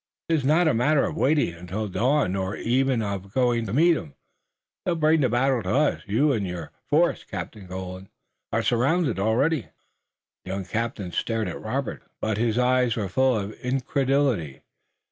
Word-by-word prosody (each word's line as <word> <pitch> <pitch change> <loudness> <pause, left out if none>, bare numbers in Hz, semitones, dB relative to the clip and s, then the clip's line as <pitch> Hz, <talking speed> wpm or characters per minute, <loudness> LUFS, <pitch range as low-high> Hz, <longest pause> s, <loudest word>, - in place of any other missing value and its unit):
"It's 160 -4 +2
not 160 +5 +3
a 155 - +3
matter 140 +5 +3
of - - -4
waiting 145 - +2
until 90 +6 -5
dawn, 130 +3 +1
nor 95 +1 -2
even 130 -1 +1
of 100 -1 -4
going 120 -3 +2
to 100 - -4
meet 165 +5 +5
'em. 75 - -7 0.7
They'll 175 - 0
bring 155 0 +3
the 130 - +3
battle 125 +1 +2
to 90 - -5
us. 150 +2 +2
You 130 +9 +2
and 105 -7 -1
your 90 -3 -6 0.2
force, - - +2
Captain 100 -3 -7
Colden, 95 +1 -7 0.4
are - - 0
surrounded 135 - +1
already." 130 +10 +1 0.8
The - - -10
young 95 -1 -3
captain 110 -2 -3
stared 110 +5 -1
at 90 - -6
Robert, - - -3 0.2
but 110 -1 -1
his 115 -1 +1
eyes 125 -1 +3
were 105 -4 -2
full 130 +4 +2
of 100 0 -3
incredulity. 130 - 0
120 Hz, 170 wpm, -25 LUFS, 100-135 Hz, 0.8 s, meet